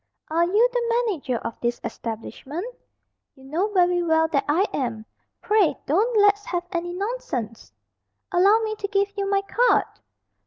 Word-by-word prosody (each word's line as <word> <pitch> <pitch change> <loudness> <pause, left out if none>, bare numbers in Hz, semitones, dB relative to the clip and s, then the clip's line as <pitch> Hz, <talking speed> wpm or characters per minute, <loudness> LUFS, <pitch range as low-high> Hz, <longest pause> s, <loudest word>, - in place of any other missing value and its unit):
"Are 335 +2 +3
you 420 +7 +4
the 475 -1 0 0.2
manager 295 - -2
of 230 - -5
this 240 0 -1
establishment?" 265 - -6 0.7
"You 265 - -18
know 320 +9 -1
very 355 -2 +3
well 320 -1 +3
that 285 -4 0
I 345 +7 +3
am. 230 -5 -3 0.4
Pray 410 -9 +3
don't 430 - +1
let's 410 0 +4
have 350 -6 -2
any 350 -1 -2
nonsense." 355 - -4 0.6
"Allow 395 +5 +4
me 435 -1 -2
to 400 - -3
give 400 0 0
you 400 -1 -2
my 395 0 +1
card." 485 +5 +3
360 Hz, 155 wpm, -24 LUFS, 290-410 Hz, 0.7 s, you